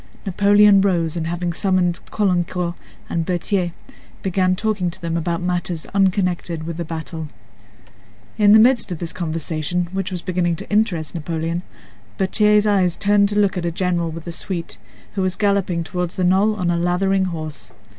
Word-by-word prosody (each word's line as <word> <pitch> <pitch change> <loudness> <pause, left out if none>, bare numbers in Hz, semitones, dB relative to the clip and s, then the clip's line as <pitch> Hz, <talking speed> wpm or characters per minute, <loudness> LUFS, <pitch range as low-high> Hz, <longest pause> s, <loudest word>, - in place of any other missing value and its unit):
Napoleon 205 +1 +5
rose 170 -5 +1
and 165 -1 -2
having 175 0 -2
summoned 185 -1 +1
Caulaincourt 180 -3 0 0.3
and 170 - -1
Berthier 180 +1 -1 0.5
began 185 -1 +1
talking 205 -3 -1
to 170 - -7
them 165 -1 -3
about 170 +1 -1
matters 175 -2 -2
unconnected 180 -4 0
with 165 0 -5
the 170 - -2
battle. 160 0 -6 1.1
In 205 -1 +5
the 215 - +9
midst 235 -2 +4
of 175 - -3
this 165 0 -4
conversation, 165 +1 -2
which 195 -1 -3
was 180 -2 -3
beginning 175 -2 0
to - - -8
interest 195 -7 +1
Napoleon, 165 +1 -3 0.6
Berthier's 210 +2 +3
eyes 190 -4 +2
turned 200 0 +3
to 205 - -1
look 200 -2 +2
at - - -5
a 170 - 0
general 175 -1 -1
with 160 0 -8
a 170 - -5
suite, 165 - -5 0.3
who 195 - -1
was 185 0 0
galloping 200 -4 +1
toward 180 +1 -3
the 185 - -3
knoll 195 +4 +3
on 180 -4 0
a 170 - 0
lathering 190 +2 +1
horse. 155 -10 -6
180 Hz, 170 wpm, -21 LUFS, 170-195 Hz, 1.1 s, the